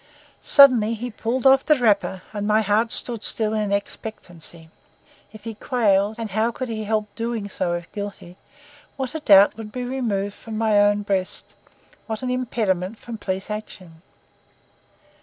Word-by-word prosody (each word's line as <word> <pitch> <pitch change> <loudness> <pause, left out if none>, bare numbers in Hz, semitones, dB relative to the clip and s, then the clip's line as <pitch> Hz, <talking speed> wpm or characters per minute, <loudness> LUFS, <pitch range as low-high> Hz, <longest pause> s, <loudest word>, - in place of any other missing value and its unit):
Suddenly 245 -6 +6
he 245 +2 -5
pulled 235 +4 -3
off 270 0 +6
the 305 - +4
wrapper, 205 -6 +1
and 205 -1 -3
my 215 +1 +3
heart 215 +3 +1
stood 235 -3 -1
still 220 -1 +1
in 210 -2 -1
expectancy. 175 -5 -5 0.6
If 215 -1 -13
he 225 0 -5
quailed—and 215 -1 0
how 220 +4 +1
could 255 +1 -5
he 220 -1 -4
help 215 -1 -1
doing 230 -3 -3
so 175 -3 -2
if 175 -1 -6
guilty—what 265 - -9
a 315 - -3
doubt 200 -6 +6
would 220 -2 -8
be 250 +1 -4
removed 225 -6 -2
from 220 0 -8
my 220 -2 +3
own 205 0 +3
breast, 195 -2 -2 0.5
what 220 +1 -4
an 250 - -1
impediment 220 -6 -1
from 230 -1 -8
police 190 +1 -4
action! 185 -6 -8
215 Hz, 155 wpm, -23 LUFS, 200-235 Hz, 0.6 s, Suddenly